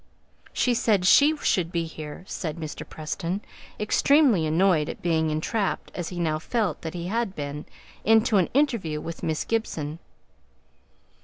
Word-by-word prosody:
"She 250 Hz, -, +1 dB
said 210 Hz, -5 st, +2 dB
she 295 Hz, +10 st, +6 dB
should 175 Hz, -, 0 dB
be 170 Hz, -1 st, 0 dB
here," 155 Hz, 0 st, -8 dB
said 165 Hz, -4 st, -4 dB
Mr. 155 Hz, -2 st, -7 dB
Preston, 165 Hz, +4 st, -3 dB, 0.4 s
extremely 230 Hz, -, +4 dB
annoyed 160 Hz, -1 st, +3 dB
at -, -, -7 dB
being 160 Hz, -2 st, +1 dB
entrapped, 190 Hz, +7 st, -1 dB
as 175 Hz, -2 st, -4 dB
he 180 Hz, -, -6 dB
now 155 Hz, -2 st, 0 dB
felt 215 Hz, +3 st, -1 dB
that 160 Hz, +1 st, -6 dB
he 170 Hz, -1 st, -4 dB
had 210 Hz, 0 st, -1 dB
been, 145 Hz, 0 st, -5 dB, 0.4 s
into 220 Hz, 0 st, +4 dB
an 185 Hz, -, +2 dB
interview 230 Hz, -, +1 dB
with 165 Hz, +2 st, -7 dB
Miss 160 Hz, -1 st, -1 dB
Gibson. 165 Hz, -9 st, -2 dB
175 Hz, 150 wpm, -25 LUFS, 155-220 Hz, 0.4 s, she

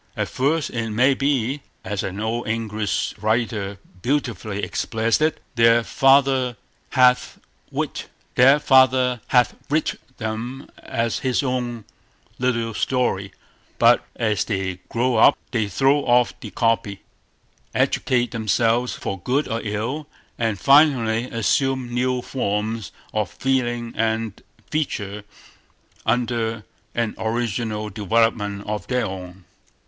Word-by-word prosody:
At -, -, -1 dB
first 145 Hz, +4 st, 0 dB
it 115 Hz, -2 st, -2 dB
may 125 Hz, +6 st, +3 dB
be, 135 Hz, 0 st, 0 dB, 0.2 s
as 105 Hz, -2 st, -2 dB
an 95 Hz, +1 st, -4 dB
old 110 Hz, +2 st, -2 dB
English 110 Hz, -2 st, -1 dB
writer 110 Hz, -3 st, -1 dB, 0.2 s
beautifully 120 Hz, -6 st, -2 dB
expresses 115 Hz, +4 st, 0 dB
it, 155 Hz, +1 st, +1 dB
"their 115 Hz, -1 st, +5 dB
father 135 Hz, -2 st, +3 dB, 0.3 s
hath 125 Hz, -1 st, +3 dB, 0.3 s
writ -, -, -3 dB, 0.3 s
them 130 Hz, -2 st, +5 dB, 1.6 s
as 115 Hz, 0 st, -2 dB
his 130 Hz, -1 st, 0 dB
own 120 Hz, -4 st, -2 dB, 0.5 s
little 115 Hz, -3 st, 0 dB
story", 105 Hz, -6 st, 0 dB, 0.5 s
but -, -, +5 dB
as 105 Hz, -5 st, 0 dB
they 95 Hz, -4 st, -2 dB
grow 120 Hz, 0 st, +1 dB
up -, -, +6 dB
they 110 Hz, -4 st, 0 dB
throw 135 Hz, +8 st, +3 dB
off 125 Hz, -3 st, +3 dB
the -, -, -8 dB
copy, 115 Hz, -4 st, 0 dB, 0.7 s
educate 120 Hz, -1 st, +1 dB
themselves 115 Hz, +2 st, +1 dB
for 95 Hz, -, -4 dB
good 130 Hz, +10 st, 0 dB
or 115 Hz, +1 st, -2 dB
ill, 115 Hz, +8 st, -3 dB, 0.3 s
and 115 Hz, -3 st, 0 dB
finally 130 Hz, -, +4 dB
assume 125 Hz, +2 st, 0 dB
new 125 Hz, 0 st, 0 dB
forms 110 Hz, -4 st, -2 dB, 0.2 s
of 105 Hz, -4 st, 0 dB
feeling 120 Hz, -2 st, -1 dB
and 110 Hz, -1 st, -1 dB, 0.3 s
feature 105 Hz, -9 st, -2 dB, 0.8 s
under 115 Hz, -2 st, 0 dB, 0.3 s
an 115 Hz, -2 st, 0 dB
original 110 Hz, -2 st, -2 dB
development 105 Hz, 0 st, +1 dB
of 105 Hz, 0 st, -4 dB
their 125 Hz, -2 st, 0 dB
own. 95 Hz, -2 st, -8 dB
115 Hz, 110 wpm, -22 LUFS, 110-130 Hz, 1.6 s, up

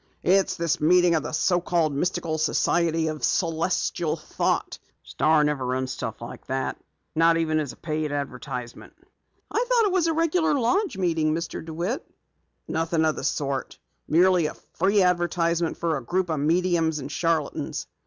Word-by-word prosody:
"It's 190 Hz, +2 st, +3 dB
this 170 Hz, -1 st, 0 dB
meeting 175 Hz, +2 st, +5 dB
of 160 Hz, -, +2 dB
the 150 Hz, -, -5 dB
so 175 Hz, +3 st, +1 dB
called 170 Hz, -4 st, +1 dB
Mystical 165 Hz, +1 st, -1 dB
Society 165 Hz, +1 st, +1 dB
of 155 Hz, -1 st, -6 dB
Celestial 165 Hz, -1 st, 0 dB
Thought. 155 Hz, -, -2 dB, 0.2 s
The -, -, -18 dB
Star 155 Hz, -1 st, +3 dB
never 150 Hz, -3 st, 0 dB
runs 130 Hz, +1 st, -2 dB
stuff 115 Hz, -2 st, -5 dB
like 120 Hz, -, -10 dB
that, 130 Hz, 0 st, -3 dB, 0.3 s
not 165 Hz, +1 st, +4 dB
even 155 Hz, -1 st, +1 dB
as 145 Hz, -5 st, -3 dB
a -, -, -13 dB
paid 155 Hz, -1 st, -3 dB
advertisement." 125 Hz, -4 st, -5 dB, 0.6 s
"I 470 Hz, -, +1 dB
thought 475 Hz, -3 st, +4 dB
it 405 Hz, -, +1 dB
was 360 Hz, -3 st, +2 dB
a 325 Hz, -, +1 dB
regular 325 Hz, -1 st, +2 dB
lodge 280 Hz, -, +1 dB
meeting, 165 Hz, -4 st, +1 dB
Mr. 165 Hz, -1 st, -4 dB
DeWitt." 170 Hz, -, -3 dB, 0.6 s
"Nothing 165 Hz, 0 st, 0 dB
of 155 Hz, -, +1 dB
the -, -, -6 dB
sort. 140 Hz, -2 st, -2 dB, 0.3 s
Merely 175 Hz, 0 st, +4 dB
a -, -, -7 dB, 0.2 s
free 195 Hz, +2 st, +3 dB
advertisement 170 Hz, -2 st, +1 dB
for 165 Hz, -2 st, 0 dB
a 135 Hz, -, -4 dB
group 180 Hz, +7 st, -1 dB
of 155 Hz, -, -1 dB
mediums 165 Hz, +1 st, +1 dB
and 140 Hz, 0 st, -6 dB
charlatans." 160 Hz, 0 st, -1 dB
165 Hz, 165 wpm, -25 LUFS, 155-180 Hz, 0.6 s, meeting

